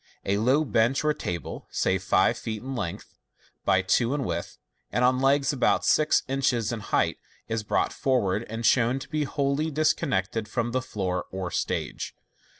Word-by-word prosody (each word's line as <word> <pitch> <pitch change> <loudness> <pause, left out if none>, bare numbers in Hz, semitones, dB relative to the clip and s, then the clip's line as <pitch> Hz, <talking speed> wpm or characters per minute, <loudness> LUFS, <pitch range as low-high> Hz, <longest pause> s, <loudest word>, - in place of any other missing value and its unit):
A 100 +1 +1
low 135 +7 +3
bench 115 +3 +2
or 150 0 +3
table, 90 - -5
say - - +1
five - - +3
feet 110 -1 -5
in 135 +1 -5
length 85 -9 -5 0.5
bv 95 +1 +3
two 120 +7 +2
in 145 - -1
width, - - -4 0.3
and 120 +3 +2
on 130 0 +3
legs 140 +1 +3
about 130 - +2
six 155 0 +3
inches 130 -4 0
in 115 - -3
height, - - 0 0.3
is 110 0 -1
brought 105 - 0
forward, 115 -6 +1
and 115 +1 -4
shown 125 +1 +4
to 135 - -7
be 155 -1 -1
wholly 140 +3 0
disconnected 140 - 0
from 120 +2 -2
the 130 +1 0
floor 90 -7 -3
or 95 -2 -4
stage. - - -3
125 Hz, 170 wpm, -26 LUFS, 105-135 Hz, 0.5 s, shown